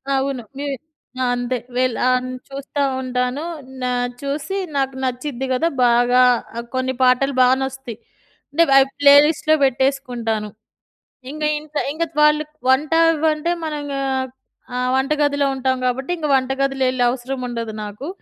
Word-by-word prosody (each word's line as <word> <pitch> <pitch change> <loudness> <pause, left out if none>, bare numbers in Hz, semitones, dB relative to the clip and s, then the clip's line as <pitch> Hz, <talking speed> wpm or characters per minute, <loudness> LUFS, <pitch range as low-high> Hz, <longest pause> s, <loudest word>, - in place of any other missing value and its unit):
అవును. 270 -2 -1 0.2
నేను 285 -1 -2 0.5
ఆ! - - +2
అంతే 245 +1 -2 0.2
వెళ్లి 255 -2 +1
ఆన్ 255 0 +1 0.2
చూస్తా 275 +1 -4 0.2
ఉంటాను. 250 +2 -2 0.4
నా 250 - -1 0.3
చూసి 290 +7 -3 0.2
నాకు 270 -1 0
నచ్చిద్ది 255 +1 -3
కదా! 310 +6 +1 0.2
బాగా 245 +1 +4 0.4
ఆహ్, 235 - -4
కొన్ని 260 0 0
పాటలు 255 +2 +3
బాగా 255 +1 +5
నచ్చుతాయి. 265 -4 -6 0.5
అంటే 330 +4 +4
అవి 270 0 +6
ప్లేలిస్ట్‌లో 295 +2 +6
పెట్టేసుకుంటాను. 245 -5 -1 0.8
ఇంగా 300 +1 -2
ఇంక 305 0 -17 0.2
ఇంగా 325 +3 -1 0.2
వాళ్ళు 300 0 +4 0.3
వంట 280 +4 +2 0.2
అవ్వంటే 315 +1 +1
మనం 310 -1 -3
ఇంగ 285 -1 -5 0.8
ఆహ్, 250 0 0
వంట 265 +2 0
గదిలో 285 -1 +2
ఉంటాం 260 0 0
కాబట్టి 260 +5 -1
ఇంక 310 -2 -2
వంటగదిలో 270 +1 0
వెళ్ళే 255 -1 0
అవసరం 255 +1 -4
ఉండదు 230 -2 -4
నాకు. 210 +7 -7
265 Hz, 140 wpm, -20 LUFS, 250-285 Hz, 0.8 s, అవి